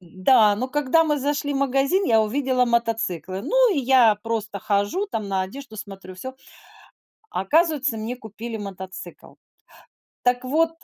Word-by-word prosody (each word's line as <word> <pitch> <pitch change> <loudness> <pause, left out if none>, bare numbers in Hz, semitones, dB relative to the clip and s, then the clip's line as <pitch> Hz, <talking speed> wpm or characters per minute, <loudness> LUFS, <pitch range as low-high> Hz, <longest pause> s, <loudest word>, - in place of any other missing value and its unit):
Да, 205 +4 +3
но 255 +4 -2
когда 295 +4 +2
мы 300 -2 +1
зашли 285 +1 -1
в - - 0
магазин, 275 +8 +1
я 225 -10 +4
увидела 255 +3 +1
мотоциклы. 225 -6 -1
Ну, - - +3
и - - 0
я 250 -4 +5
просто 220 -3 -3
хожу 205 - 0
там, 215 - -4
на 190 -1 0
одежду 220 +4 -9
смотрю, 195 -3 -9
всё. 260 +8 -7 1.0
А - - -2
оказывается, 295 - +2
мне 225 +3 -4
купили 225 0 -7
мотоцикл. 190 -2 -9 0.9
Так 245 0 +2
вот 320 +5 +2
235 Hz, 150 wpm, -23 LUFS, 205-275 Hz, 1.0 s, я